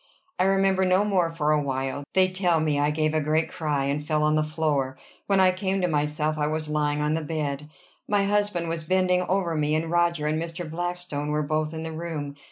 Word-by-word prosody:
I 185 - +4
remember 195 0 +3
no 185 +2 +3
more 185 -5 +2
for 155 -2 0
a 150 -1 +3
while. 135 0 -3
They 185 0 +5
tell 180 -3 +1
me 150 -2 +1
I 145 +1 +2
gave 155 0 0
a 155 - +1
great 155 +2 +1
cry, 150 -4 -1
and 145 +2 -1
fell 150 0 0
on 150 0 +3
the 155 - +3
floor. 150 -4 -1 0.3
When 195 -1 +3
I 185 -1 +6
came 190 +1 -1
to 180 - +2
myself 150 0 0
I 150 - +1
was 155 0 -2
lying 150 -1 0
on 150 +1 +1
the 160 - 0
bed. 150 -2 -3 0.4
My 205 -1 +2
husband 205 -4 0
was 165 -1 -3
bending 180 +1 +2
over 180 -2 0
me, 150 -1 +1
and 160 +1 -1
Roger 170 -3 +1
and 155 +1 0
Mr. 165 0 -5
Blackstone 175 -2 -4
were 150 0 0
both 155 +1 -1
in 160 0 -5
the 160 - -5
room. 160 -3 -5
155 Hz, 225 wpm, -25 LUFS, 150-180 Hz, 0.4 s, I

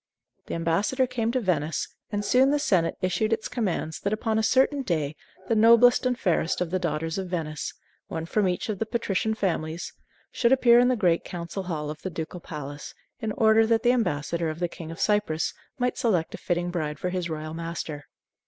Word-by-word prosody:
The - - -3
ambassador 180 +11 +1
came 235 -2 -1
to 255 - +1
Venice, 165 - 0 0.2
and 205 -1 -2
soon 255 +5 +4
the 295 - +3
senate 185 - +1
issued 215 +4 +1
its 220 -1 0
commands 195 -10 -2
that 200 - -2
upon 220 0 0
a - - +2
certain 265 +5 +3
day 155 - -1 0.3
the - - +2
noblest 235 +3 +6
and 250 -1 0
fairest 175 -4 +1
of 180 -2 -2
the 185 - +1
daughters 165 0 -2
of 190 - -4
Venice 155 -5 -3 0.4
one 160 0 -4
from 200 +3 +1
each 180 -1 -1
of 210 -4 -3
the 225 - -1
patrician 220 -2 -1
families 170 -4 -2 0.4
should 235 -1 +2
appear 245 -3 +6
in 245 - +5
the 255 - +3
great 180 -7 +2
Council 175 +2 -5
Hall 155 -5 -3
of 155 - -9
the 185 - -3
Ducal 165 +1 -5
Palace 145 -3 -8 0.2
in 220 -4 -2
order 220 0 +4
that 225 0 +2
the 245 - +5
ambassador 170 - 0
of 155 - -5
the 175 0 0
King 165 -1 -9
of 165 - -8
Cyprus 205 -7 +1 0.2
might 250 -1 -1
select 200 -10 +1
a - - -6
fitting 175 0 -1
bride 155 -4 -2
for 180 - -2
his 180 -2 -2
royal 155 0 -5
master. 165 -3 -5
185 Hz, 205 wpm, -26 LUFS, 165-225 Hz, 0.4 s, noblest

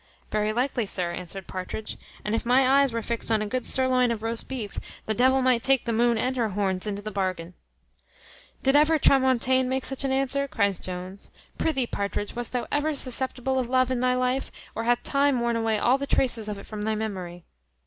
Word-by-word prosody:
"Very 215 0 +1
likely, 245 -1 -1
sir," 180 -3 0
answered 180 +2 -6
Partridge; 190 +4 -6 0.3
"and 210 - -1
if 225 - 0
my 255 +2 +4
eyes 275 0 +4
were 230 0 -3
fixed 230 0 -3
on 215 -1 +2
a - - -3
good 250 +4 -2
surloin 255 -1 +3
of 225 -2 -4
roast 230 0 -3
beef, 235 -7 -5 0.3
the 220 - 0
devil 260 +3 +3
might 250 -2 +3
take 270 -1 +2
the 235 - -1
moon 235 +1 +3
and 255 +3 0
her 230 -3 +1
horns 190 -1 -1
into 205 0 -4
the 215 - -5
bargain." 185 -3 -3 1.1
"Did 270 +1 +3
ever 305 +2 +5
Tramontane 260 -2 +3
make 260 0 -1
such 270 0 -3
an 270 - 0
answer?" 275 +1 +1
cries 200 -7 0
Jones. 185 +2 -8 0.3
"Prithee, 270 -6 +1
Partridge, 200 -2 -3
wast 240 -1 -2
thou 250 -1 -2
ever 295 +1 +1
susceptible 260 0 0
of 245 -2 -2
love 255 0 +2
in 255 - 0
thy 250 0 +2
life, 255 +1 -1 0.2
or 225 - -4
hath 240 0 +2
time 280 -2 +2
worn 235 0 0
away 225 -1 +1
all 250 +5 +3
the 280 - -3
traces 230 -6 0
of 210 - -4
it 200 - -10
from 215 -1 -7
thy 220 +1 0
memory?" 185 -5 -5
235 Hz, 210 wpm, -26 LUFS, 210-260 Hz, 1.1 s, ever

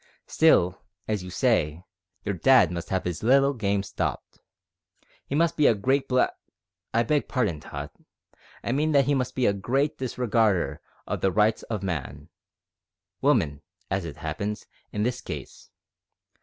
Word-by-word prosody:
Still, 90 - +3 0.3
as 105 -4 -1
you 90 - -7
say, 90 - +1 0.4
your 100 - 0
dad 105 0 +5
must 85 -1 -5
have 95 -1 0
his 90 -3 -3
little 135 +4 +4
game 100 -5 0
stopped. - - -4 0.9
He 140 - -2
must 170 +2 +2
be 150 - +4
a 115 - +5
great 135 +6 0
blackg 130 0 +3 0.6
I 115 +1 +2
beg 145 +5 0
pardon, 105 - 0
Tot, 75 0 -7 0.7
I - - -1
mean 150 +4 +1
that 140 -2 +5
he 145 - +2
must 130 -2 -1
be 130 - +1
a 100 - +4
great 135 +9 -1
disregarder 115 -7 +1 0.2
of - - -3
the 95 - +2
rights 110 +2 +2
of 105 -4 -3
man 75 -4 -4 0.9
woman, 70 0 +2 0.3
as 95 -1 0
it 80 -4 -7
happens, 85 +7 -4 0.3
in 105 - -1
this 125 +2 -1
case. - - -8
105 Hz, 155 wpm, -26 LUFS, 90-130 Hz, 0.9 s, dad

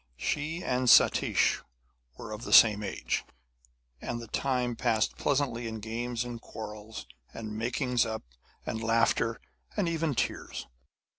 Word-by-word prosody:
She 155 - -2
and 125 0 0
Satish - - +5 0.6
were 115 - -8
of 105 0 -6
the - - -6
same 105 -2 +8
age, 100 - -2 0.8
and 120 - -3
the 115 - -7
time 125 0 -1
passed 115 -2 +1
pleasantly 130 -4 0
in 110 0 -5
games 120 +2 -3
and 120 -1 -6
quarrels 110 -1 -8 0.3
and 110 -1 -6
makings 125 +2 +1
up 110 -1 -4 0.4
and 110 0 -3
laughter 115 0 +2 0.4
and 200 -4 +1
even 165 -3 0
tears. - - -2
115 Hz, 135 wpm, -29 LUFS, 110-125 Hz, 0.8 s, same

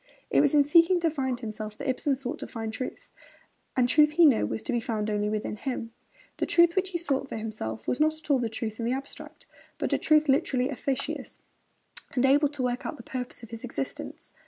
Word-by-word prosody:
It - - +5
was 295 0 +3
in 290 - +7
seeking 335 +5 +5
to 330 -1 +2
find 260 -5 -2
himself 215 -1 -6
that 280 - -5
Ibsen 270 +2 +1
sought 255 -1 -5
to - - -5
find 225 -2 -5
truth; 255 - -6 0.7
and 250 -1 +4
truth 300 +4 +5
he 340 +1 +6
knew 245 - +4
was 110 0 -4
to - - -2
be 240 - +1
found 215 -2 -2
only 210 0 0
within 210 0 -3
him. 240 -2 -4 0.5
The - - -1
truth 340 -1 +5
which 380 0 +1
he 360 - -2
sought 280 -5 -2
for - - -4
himself 165 - -5
was 250 - 0
not 310 +1 +3
at 310 -1 -4
all 265 -3 +4
truth 220 0 -4
in 230 - -2
the 245 - +1
abstract, 270 +1 -8 0.3
but - - -1
a - - +2
truth 310 0 +4
literally 270 -2 +2
'efficacious,' 275 0 -4 0.7
and 255 0 +3
able 285 +2 +5
to 285 -3 -4
work 245 0 -1
out 305 - -5
the - - -11
purpose 250 -2 -6
of 230 - -11
his 230 -1 -7
existence. 250 +2 -5
260 Hz, 225 wpm, -27 LUFS, 225-295 Hz, 0.7 s, in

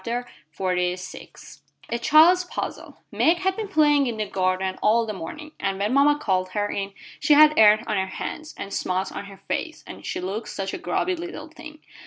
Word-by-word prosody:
A 240 +1 -3 1.7
CHILD'S 330 +8 +5
PUZZLE - - -6
Meg 335 +2 +3
had 380 +1 0
been 435 0 -4
playing 295 -6 +3
in 235 -2 -3
the 215 - -1
garden 185 -1 -1
all 225 +2 +3
the 215 - -4
morning, 300 - -8
and 195 -1 -1
when 205 +4 -1
mama 290 +2 +4
called 185 -9 -1
her 205 0 0
in 195 0 -4 0.3
she 295 - +4
had 305 +1 +7
earth 215 0 +6
on 210 - -1
her 190 0 0
hands, 310 - -6
and 200 - -6
smuts 185 +1 -1
on - - -6
her 195 -1 -13
face, - - -3
and - - -10
she - - -4
looked 195 +5 -4
such 195 -1 -4
a - - -4
grubby 360 - -1
little 335 -2 -7
thing. 315 -1 -12
230 Hz, 190 wpm, -24 LUFS, 195-310 Hz, 1.7 s, had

